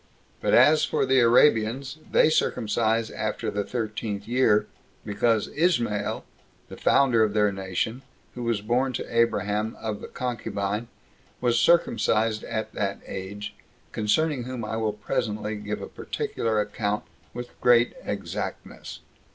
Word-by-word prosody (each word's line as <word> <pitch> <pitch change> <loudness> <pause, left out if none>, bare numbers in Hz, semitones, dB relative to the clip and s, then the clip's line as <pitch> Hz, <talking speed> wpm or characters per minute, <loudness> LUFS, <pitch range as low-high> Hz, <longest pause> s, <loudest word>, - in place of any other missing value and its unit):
But - - +3
as 155 +1 +6
for - - +1
the 130 0 +4
Arabians, 120 +3 +3
they 155 - +5
circumcise 115 -4 +1
after 110 -1 -3
the 105 0 -1
thirteenth 110 -3 -4
year, 115 -4 +3 0.4
because 110 +1 +1
Ismael, 120 - 0 0.4
the - - -8
founder 125 -5 +4
of 105 -1 0
their 105 -1 +3
nation, 95 +5 -3 0.3
who 125 - -7
was 115 -3 0
born 125 +4 0
to 115 - -5
Abraham 110 -2 +1
of 110 -2 -4
the - - -7
concubine, 110 -3 -3 0.5
was 120 -1 +2
circumcised 115 -9 +2
at 110 -1 -4
that 100 -1 -2
age; 100 +2 -6 0.4
concerning 130 +4 0
whom 125 -3 -5
I 110 - -3
will 110 -2 -1
presently 105 -1 -2
give 105 0 -5
a - - -5
particular 110 -2 -2
account, 105 0 -1 0.3
with 120 0 -8
great 120 -1 +5
exactness. - - -5
110 Hz, 135 wpm, -26 LUFS, 105-120 Hz, 0.5 s, as